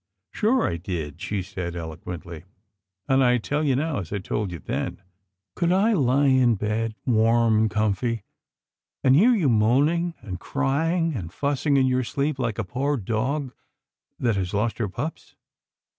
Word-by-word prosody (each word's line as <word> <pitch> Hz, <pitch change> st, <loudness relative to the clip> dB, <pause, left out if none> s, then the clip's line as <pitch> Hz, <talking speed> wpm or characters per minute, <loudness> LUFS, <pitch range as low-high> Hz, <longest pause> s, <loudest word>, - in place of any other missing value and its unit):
" -, -, -54 dB
Sure 235 Hz, +4 st, +2 dB
I 85 Hz, -, -2 dB
did," 85 Hz, -3 st, -5 dB
she 100 Hz, -3 st, -2 dB
said 90 Hz, -1 st, -5 dB
eloquently, 85 Hz, 0 st, -7 dB, 0.3 s
" 95 Hz, 0 st, -57 dB
and 135 Hz, 0 st, +4 dB
I 125 Hz, -1 st, +4 dB
tell 145 Hz, +6 st, -2 dB
you 140 Hz, -4 st, +2 dB
now, 150 Hz, -1 st, -1 dB
as 90 Hz, -, -7 dB
I 105 Hz, -, -1 dB
told 100 Hz, 0 st, -3 dB
you 85 Hz, -, -5 dB
then 75 Hz, -, -4 dB, 0.3 s
— 95 Hz, 0 st, -59 dB
could 170 Hz, 0 st, +1 dB
I 200 Hz, +5 st, +3 dB
He 135 Hz, -, +3 dB
in 120 Hz, -2 st, +4 dB
bed 110 Hz, +2 st, -2 dB
warm 115 Hz, -1 st, +3 dB
and 110 Hz, 0 st, +2 dB
comfy, 110 Hz, +1 st, 0 dB, 0.8 s
and 130 Hz, 0 st, +5 dB
hear 235 Hz, -, +5 dB
you 180 Hz, -9 st, +1 dB
moaning 140 Hz, +10 st, +2 dB
and 95 Hz, -5 st, -6 dB
cry 145 Hz, -, 0 dB
ing 165 Hz, -2 st, +1 dB
and 90 Hz, -, -5 dB
fussing 140 Hz, -, 0 dB
in 135 Hz, -, +4 dB
your 130 Hz, 0 st, +1 dB
sleep 140 Hz, +3 st, -2 dB
like 115 Hz, -4 st, -1 dB
a 115 Hz, -, -1 dB
poor 135 Hz, +8 st, -1 dB
dog 125 Hz, +6 st, -2 dB, 0.7 s
that 115 Hz, -5 st, 0 dB
has 95 Hz, +1 st, -2 dB
lost 110 Hz, +3 st, 0 dB
her 105 Hz, -4 st, -1 dB
pups 145 Hz, -, -6 dB
120 Hz, 180 wpm, -24 LUFS, 100-140 Hz, 0.8 s, and